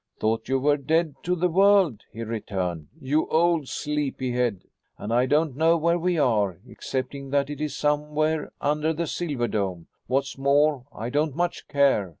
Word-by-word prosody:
"Thought 110 +2 -1
you 135 - +2
were 145 +2 +2
dead 155 +2 +1
to 180 +1 0
the 180 +1 +1
world," 190 - +4
he 115 - -6
returned, 95 -8 -3
"you 145 +4 0
old 165 -3 +2
sleepy 145 -4 -2
head. 120 -6 -1 0.3
And 110 +2 -4
I 125 +2 +3
don't 150 -1 +1
know 165 +3 +3
where 170 +2 +1
we 175 0 0
are, 105 - +2
excepting 135 +1 -5
that 140 +1 0
it 145 - -6
is 150 -1 -3
somewhere 150 +1 0
under 150 +2 0
the 170 +2 -2
silver 145 -8 -2
dome. 95 -6 -2 0.2
What's 135 +2 -1
more, 140 -1 +2
I 115 +3 -5
don't 145 0 0
much 175 +1 -2
care. 140 -9 +2
145 Hz, 170 wpm, -25 LUFS, 125-155 Hz, 0.3 s, world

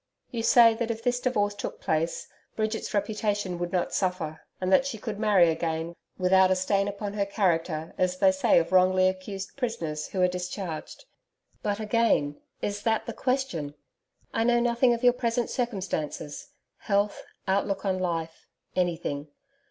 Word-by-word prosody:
You 235 - -2
say 230 0 +7
that 230 0 -3
if 230 0 -3
this 245 0 +1
divorce 210 -5 +1
took 205 - -6
place, 160 +2 -1 0.3
Bridget's 220 0 -2
reputation 205 -3 -1
would 175 0 -3
not 180 -2 -1
suffer, 180 -5 -1 0.2
and 185 0 0
that 225 - +6
she 235 - -4
could 210 -1 -5
marry 200 -6 +5
again 160 +1 -2 0.2
without 185 0 +5
a 185 - +3
stain 195 +2 +1
upon 205 0 -4
her 205 -1 0
character 170 -5 0
as 185 0 +1
they 285 +8 +5
say 280 -5 +3
of 170 0 +2
wrongfully 185 0 +5
accused 190 +1 -4
prisoners 165 - -3
who 190 - -4
are 180 - +5
discharged. 180 - -5 0.6
But 205 0 -1
again 215 -10 +1 0.2
is 205 0 -2
that 225 0 +1
the - - -5
question? 250 - -2 0.6
I 225 - +1
know 240 0 +4
nothing 240 +1 +3
of 235 - -8
your 245 -1 +6
present 240 -1 -1
circumstances 195 - -3 0.3
health, 205 -1 0 0.3
outlook 195 0 0
on 190 -1 0
life 165 -3 -3 0.3
anything. 165 -5 -1
195 Hz, 160 wpm, -27 LUFS, 175-225 Hz, 0.6 s, say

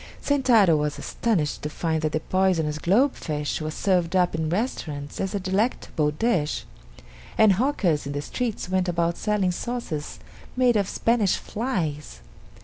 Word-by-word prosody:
Sentaro 240 - +4
was 150 -1 -1
astonished 180 -11 -1
to 150 - -3
find 160 0 -1
that 155 -1 0
the 155 - 0
poisonous 170 -6 +1
globe 235 - +3
fish 150 0 -3
was 155 0 -4
served 180 -2 +1
up 180 -1 +3
in 160 -1 -1
restaurants 155 - -3
as 195 +2 -2
a - - 0
delectable 190 -5 0
dish, 155 -1 0 0.7
and 215 -2 +6
hawkers 185 - +1
in 140 - -4
the 145 - -2
streets 235 +3 -3
went 185 0 0
about 170 0 0
selling 210 -4 0
sauces 180 -8 -4 0.4
made 250 -2 +4
of 200 -2 +1
Spanish 225 -5 +2
flies. 160 - -3
180 Hz, 150 wpm, -25 LUFS, 155-215 Hz, 0.7 s, and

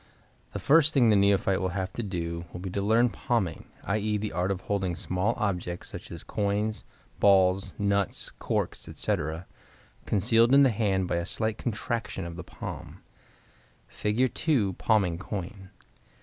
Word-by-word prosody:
—The - - -3
first 155 +1 +4
thing 120 -4 +5
the - - +5
neophyte 100 -1 +3
will 95 +1 -2
have 95 0 -3
to - - -3
do 85 -4 -4
will - - -7
be 95 0 -5
to 100 - -2
learn 115 +4 +4
palming, 95 -4 -1 0.2
i.e., 105 +1 0
the 105 0 -3
art 90 +2 -1
of 95 -2 -2
holding 95 -4 -1
small 95 +6 -1
objects, 90 -4 -2
such - - -9
as 85 -2 -8
coins, 105 +1 -1 0.4
balls, 95 -1 +4
nuts, 100 -1 0
corks, - - -2
etc., 80 +4 -2 0.6
concealed 115 +5 +4
in 140 - +8
the 130 - +5
hand 100 -4 0
by 85 - 0
a 85 - -2
slight 110 +1 -2
contraction 115 -4 -3
of 85 -1 -6
the 90 - -7
palm. - - -8 0.9
Fig. 115 +5 0
2. 120 -12 +1
Palming 95 -5 +1
Coin. 95 0 -6
100 Hz, 160 wpm, -28 LUFS, 90-110 Hz, 0.9 s, in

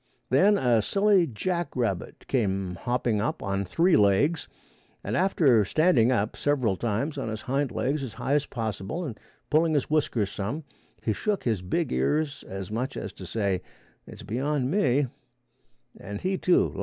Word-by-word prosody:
Then 195 +11 +5
a 120 - +3
silly 195 - +3
jackrabbit 130 - -2
came 95 -7 0
hopping 120 +3 -1
up 155 +9 -2
on 100 0 -1
three 165 - +3
legs, 105 - +3 0.6
and 105 - -2
after 140 - +4
standing 130 - +3
up 110 -4 0
several 130 -9 +1
times 120 +8 -2
on 120 -4 -3
his 110 0 -5
hind 135 +1 0
legs 140 +5 -1
as 125 -5 -6
high 140 - -1
as 145 0 +2
possible 110 - -4
and 120 -8 -6 0.3
pulling 160 +1 +3
his 145 0 0
whiskers 120 -10 +1
some, 110 +12 -4 0.4
he 110 - +1
shook 210 - -1
his 110 -6 0
big 90 -6 -1
ears 140 - 0
as 95 0 -6
much 125 +5 -3
as 95 - -5
to 95 - -10
say, 100 -2 -1 0.5
"It's - - -11
beyond 130 +5 -1
me," 145 -7 +3 0.9
and 100 +2 -6
he, 190 +1 -1
too, 180 -1 +3
left. - - -9
125 Hz, 165 wpm, -27 LUFS, 105-155 Hz, 0.9 s, Then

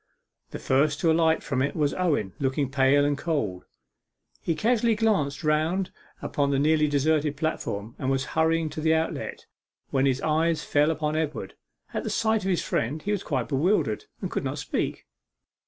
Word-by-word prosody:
The - - -6
first 140 +2 +1
to 165 - +4
alight 160 0 +3
from 135 -3 -1
it 140 - -1
was 150 -2 +1
Owen, 145 - 0
looking 135 0 0
pale 140 +1 +4
and 145 0 +1
cold. 140 - -2 0.8
He 165 - -1
casually 230 +3 +2
glanced 200 -11 0
round 160 +5 +1 0.3
upon 140 -1 0
the 140 - +1
nearly 155 +2 +3
deserted 145 0 +1
platform, 115 -9 -3
and 130 - -1
was 135 0 0
hurrying 160 0 +2
to 155 - -5
the 160 +1 +3
outlet, 160 0 -3 0.5
when 135 0 +2
his 130 -1 +1
eyes 160 +1 +1
fell 145 +1 +2
upon 155 -1 -1
Edward. 155 -1 -3 0.4
At - - -2
sight 220 -2 +1
of 190 - -1
his 180 - +1
friend 145 +7 -2
he 205 - -1
was 205 - 0
quite 130 -6 -2
bewildered, 145 - +1 0.2
and - - -3
could - - -2
not - - -3
speak. - - -3
150 Hz, 175 wpm, -26 LUFS, 140-165 Hz, 0.8 s, to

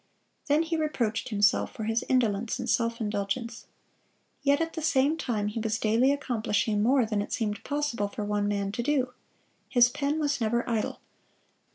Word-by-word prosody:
Then 300 +2 +3
he 330 0 -2
reproached 255 -7 -1
himself 205 +1 +2
for 220 - -5
his 225 +2 0
indolence 230 -4 +1
and - - -5
self 230 0 +1
indulgence. 220 +2 -3 0.7
Yet 285 0 +3
at 330 0 -2
the 320 - -4
same 300 -1 +2
time 220 -9 -2
he 215 - -4
was 220 0 -1
daily 230 +5 +3
accomplishing 220 -6 0
more 250 +2 +4
than 215 -2 -1
it - - -6
seemed 210 -2 -2
possible 290 -8 -1
for 205 +1 -5
one 205 0 0
man 200 -1 -1
to 220 - -3
do. 255 -1 0 0.6
His 240 -2 +5
pen 285 +4 -1
was 285 -4 0
never 235 +2 0
idle. 225 -3 -2
235 Hz, 175 wpm, -28 LUFS, 210-280 Hz, 0.7 s, His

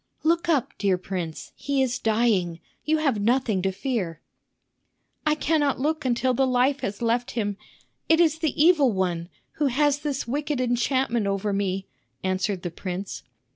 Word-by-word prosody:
"Look 335 +1 +2
up, 290 -7 +1
dear 195 -3 +2
prince, 180 -3 -5
he 275 -1 0
is 250 -2 -1
dying. 215 -7 +1 0.2
You 315 +1 +2
have 275 -9 +1
nothing 230 -3 +2
to 190 +1 0
fear." 190 - -3 1.1
"I 305 - +4
cannot 300 -3 +1
look 310 +2 -1
until 255 +1 +2
the 265 +2 +2
life 255 +2 +2
has 200 -1 -4
left 235 +2 +1
him. 205 -3 0 0.5
It 325 0 +5
is 320 -2 +3
the 315 -4 -1
evil 305 -5 +5
one, 180 -3 -1 0.3
who 295 - +2
has 290 +2 +2
this 285 -4 -3
wicked 290 +2 -1
enchantment 245 -2 +1
over 200 +1 -1
me," 195 -1 -1 0.4
answered 190 0 -1
the 175 - -3
prince. 185 +3 -5
240 Hz, 160 wpm, -25 LUFS, 195-285 Hz, 1.1 s, It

